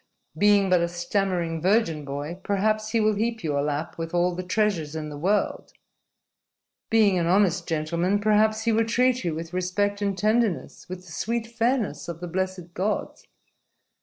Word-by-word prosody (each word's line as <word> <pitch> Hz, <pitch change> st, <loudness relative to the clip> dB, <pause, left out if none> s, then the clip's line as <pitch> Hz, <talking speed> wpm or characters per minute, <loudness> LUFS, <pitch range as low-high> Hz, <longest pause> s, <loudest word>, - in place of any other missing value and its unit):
Being 205 Hz, +3 st, +4 dB
but 180 Hz, -2 st, +5 dB
a 170 Hz, -, +1 dB
stammering 175 Hz, -1 st, -1 dB
virgin 180 Hz, -6 st, +1 dB
boy, 145 Hz, +5 st, -5 dB
perhaps 215 Hz, +2 st, 0 dB
he 230 Hz, +1 st, +1 dB
will 215 Hz, 0 st, +3 dB
heap 225 Hz, +2 st, -2 dB
your 145 Hz, -3 st, 0 dB
lap 150 Hz, +3 st, -3 dB
with 165 Hz, +1 st, -4 dB
all 175 Hz, +1 st, +2 dB
the 180 Hz, -, -4 dB
treasures 180 Hz, -5 st, -1 dB
in 155 Hz, -1 st, -4 dB
the 145 Hz, -, -7 dB
world. 200 Hz, +6 st, 0 dB, 1.2 s
Being 210 Hz, -5 st, +4 dB
an 170 Hz, -, 0 dB
honest 185 Hz, -1 st, +2 dB
gentleman, 170 Hz, +5 st, 0 dB
perhaps 215 Hz, +1 st, +2 dB
he 230 Hz, -, +2 dB
will 225 Hz, +1 st, +2 dB
treat 250 Hz, +1 st, +2 dB
you 170 Hz, -3 st, -1 dB
with 165 Hz, +1 st, -7 dB
respect 200 Hz, +3 st, -1 dB
and 200 Hz, -2 st, -1 dB
tenderness, 215 Hz, -4 st, 0 dB
with 185 Hz, 0 st, -7 dB
the 170 Hz, -, -13 dB
sweet 230 Hz, +7 st, -2 dB
fairness 235 Hz, 0 st, -1 dB
of 170 Hz, -1 st, -6 dB
the 175 Hz, -, -5 dB
blessed 185 Hz, -1 st, -3 dB
gods. 200 Hz, +4 st, -3 dB
185 Hz, 170 wpm, -25 LUFS, 170-215 Hz, 1.2 s, but